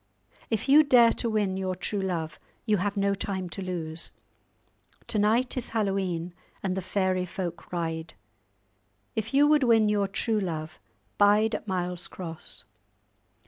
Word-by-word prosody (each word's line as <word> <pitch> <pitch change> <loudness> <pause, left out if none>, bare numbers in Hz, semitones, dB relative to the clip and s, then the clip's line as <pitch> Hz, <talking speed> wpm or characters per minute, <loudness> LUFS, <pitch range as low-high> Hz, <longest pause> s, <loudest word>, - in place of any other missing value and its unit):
If 225 +1 -1
you 290 +3 +8
dare 245 -5 +6
to 235 - -1
win 205 -4 0
your 185 -1 -2
true 195 +3 -2
love, 170 -5 -3 0.3
you 215 -3 +3
have 200 +2 -2
no 200 0 +2
time 190 -2 -3
to 195 - -5
lose. 165 -3 -2 1.0
To 215 - -1
night 225 +5 +2
is 250 - -1
Hallowe'en, 190 -5 -1 0.3
and 185 -2 -1
the 190 - -2
fairy 185 0 0
folk 180 -2 -6
ride. 165 -2 -3 1.0
If 220 0 -2
you 280 +2 +5
would 300 0 +4
win 225 -4 +4
your 205 -1 +2
true 215 +2 0
love, 160 -5 -4 0.4
bide 210 +2 +5
at 215 - -4
Miles 180 -1 -2
Cross." 165 -3 -7
195 Hz, 150 wpm, -27 LUFS, 180-220 Hz, 1.0 s, you